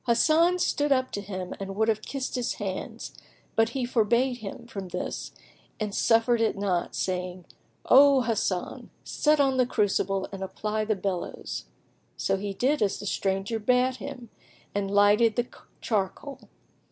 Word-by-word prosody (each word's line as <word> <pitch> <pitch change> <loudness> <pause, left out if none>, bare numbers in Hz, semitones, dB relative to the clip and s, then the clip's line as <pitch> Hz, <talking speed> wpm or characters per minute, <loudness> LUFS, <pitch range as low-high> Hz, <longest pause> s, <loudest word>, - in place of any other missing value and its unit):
Hasan 320 +9 +4
stood 295 -4 0
up 260 -1 +2
to 205 - -3
him 185 -2 -5
and 195 0 -5
would 220 +2 +1
have 215 -1 +1
kissed 270 +3 -4
his 250 -1 -1
hands; 195 -3 -5 0.4
but 225 0 +3
he 250 +1 -2
forbade 240 +2 +2
him 220 +2 -8
from 195 -5 -7
this 180 0 -5 0.5
and 210 -2 -3
suffered 230 +2 +3
it 225 - +1
not, 190 -4 -1
saying, 180 -1 -3 0.4
"O 275 0 +7
Hasan, 215 -6 -2
set 300 0 +2
on 270 -2 +3
the 255 -1 +3
crucible 195 -4 0
and 195 -1 -7
apply 215 +3 -2
the 215 0 +1
bellows."[FN#12] 190 -2 -4 0.5
So 195 - 0
he 200 +1 -4
did 265 +9 0
as 200 -2 +1
the - - -7
stranger 195 +3 -1
bade 250 +3 +2
him 260 -4 -8 0.4
and 200 -1 -1
lighted 205 +3 +4
the 240 - +1 0.4
charcoal. 220 +6 -3
220 Hz, 155 wpm, -27 LUFS, 195-250 Hz, 0.5 s, O